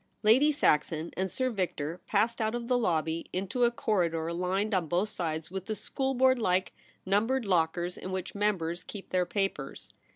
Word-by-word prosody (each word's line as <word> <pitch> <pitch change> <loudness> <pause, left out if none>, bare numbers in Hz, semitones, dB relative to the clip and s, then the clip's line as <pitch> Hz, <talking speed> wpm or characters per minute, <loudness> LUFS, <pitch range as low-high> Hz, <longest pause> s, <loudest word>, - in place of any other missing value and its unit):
Lady 255 +8 +6
Saxon 160 - +1
and 190 +1 -1
Sir 255 +6 0
Victor 175 -5 -3
passed 225 +3 +1
out 220 +1 0
of 235 -1 -4
the 250 - +2
lobby 165 -7 0
into 200 +7 0
a - - +5
corridor 170 -8 0
lined 190 +5 0
on 180 -4 +1
both 180 +6 +1
sides 160 -4 -3
with 190 0 -5
the 215 - -2
schoolboard 260 +4 +1
like 185 -4 +1 0.3
numbered 225 +6 +1
lockers 175 -1 0
in 185 - -6
which 185 -1 -4
members 185 -5 0
keep 200 -2 -9
their 180 -1 +1
papers. 195 -8 -3
190 Hz, 170 wpm, -29 LUFS, 170-220 Hz, 0.3 s, Lady